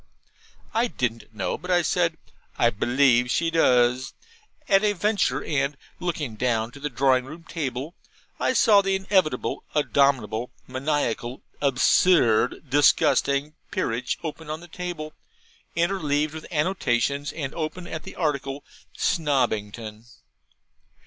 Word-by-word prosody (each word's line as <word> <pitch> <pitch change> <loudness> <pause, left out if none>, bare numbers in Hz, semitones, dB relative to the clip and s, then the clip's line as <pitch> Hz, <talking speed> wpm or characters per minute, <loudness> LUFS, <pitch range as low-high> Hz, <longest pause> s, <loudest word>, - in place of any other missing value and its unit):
I 230 +2 +2
didn't 115 - -3
know, 100 -4 -3
but 180 - -9
I 175 -1 +3
said, 170 -1 +1 0.4
'I 120 - +4
believe 125 +2 +3
she 165 +5 +1
does,' 125 -5 +3 0.5
at 195 0 +4
a 210 -1 +3
venture; 205 +1 0
and, 140 -1 -1 0.2
looking 150 -10 -3
down 115 -2 0
to 140 - -12
the 150 +1 -3
drawing 130 0 +2
room 155 +5 -10
table, 145 -2 -4 0.6
saw 210 -3 +6
the 195 0 0
inevitable, 190 -4 0
abominable, 130 -6 +2 0.2
maniacal, 130 -2 -2 0.2
absurd, 135 -2 +3
disgusting 140 +1 +3 0.2
'Peerage' 120 +2 -2
open 160 -1 -6
on 155 +1 -3
the 175 - -12
table, 175 -3 -6 0.6
interleaved 155 -4 0
with 160 -1 -8
annotations, 145 - 0
and 140 -3 -5
open 170 +2 -4
at 160 -2 -5
the - - -10
article 140 -3 -2 0.3
'Snobbington.' 115 -7 -1
145 Hz, 120 wpm, -25 LUFS, 125-165 Hz, 0.6 s, saw